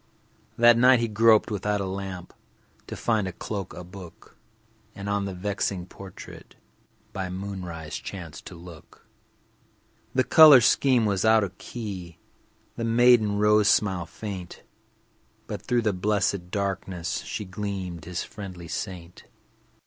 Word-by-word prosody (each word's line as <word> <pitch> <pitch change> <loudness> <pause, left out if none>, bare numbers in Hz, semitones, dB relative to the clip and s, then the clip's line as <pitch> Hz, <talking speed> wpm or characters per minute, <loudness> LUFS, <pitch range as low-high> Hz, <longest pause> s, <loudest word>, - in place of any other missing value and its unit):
That 120 0 +6
night 125 0 +6
he 115 - 0
groped 110 0 +4
without 105 0 -1
a 100 - -2
lamp 95 -2 -6 0.5
To - - -6
find 110 -4 0
a - - -4
cloak, 100 +2 -6
a 90 - -8
book, 90 -1 -13 0.6
And 100 0 -7
on 100 -1 0
the 95 - -4
vexing 95 -1 -2
portrait 95 0 -12 0.6
By 95 -1 -4
moonrise 90 -4 -6
chanced 85 -6 -9
to 90 - -9
look. 85 -2 -14 1.1
The 130 - +4
color 155 -3 +9
scheme 125 0 +3
was 100 -3 0
out 110 -1 +5
of 95 -2 -5
key, 95 -8 -7 0.6
The 115 - -3
maiden 115 -2 +4
rose 105 0 +4
smile 95 -5 +2
faint, 95 -1 -8 0.8
But - - -6
through 120 -1 0
the 105 -2 +1
blessed 100 -1 -1
darkness 95 -3 -3
She 105 - -6
gleamed, 95 -3 -5
his 90 0 -4
friendly 95 -5 -9
saint. 90 -3 -6
100 Hz, 135 wpm, -26 LUFS, 90-110 Hz, 1.1 s, color